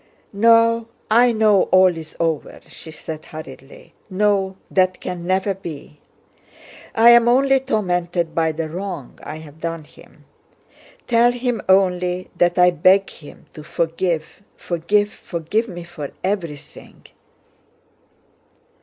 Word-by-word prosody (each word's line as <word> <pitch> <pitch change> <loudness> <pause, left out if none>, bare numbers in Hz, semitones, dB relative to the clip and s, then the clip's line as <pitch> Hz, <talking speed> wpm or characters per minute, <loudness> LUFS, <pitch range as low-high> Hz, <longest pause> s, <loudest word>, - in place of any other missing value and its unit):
"No, 230 +2 +4 0.2
I 240 +2 +5
know 215 -3 +3
all 185 -1 +5
is 160 -1 -10
over," 165 -3 -2
she - - -12
said 155 0 -8
hurriedly. 135 -3 -12 0.2
"No, 195 -1 0
that 185 -1 +1
can 175 -1 -6
never 190 +2 +1
be. 155 -5 -10 1.0
I'm 235 +1 +6
only 270 +2 +4
tormented 175 -8 -1
by 160 0 +1
the 160 +1 -4
wrong 175 -4 -7
I - - -7
have 155 -1 -12
done 165 -1 -4
him. - - -20 0.8
Tell 240 0 +3
him 245 -3 -2
only 180 -1 +1
that 175 0 +1
I 180 0 +6
beg 185 +4 +3
him 145 - -14
to 155 - -10
forgive, 165 +1 -3
forgive, 205 +5 0
forgive 175 +7 -3
me 175 -4 -8
for 170 -5 -8
everything...." 175 -7 -6
180 Hz, 120 wpm, -20 LUFS, 165-210 Hz, 1.0 s, I'm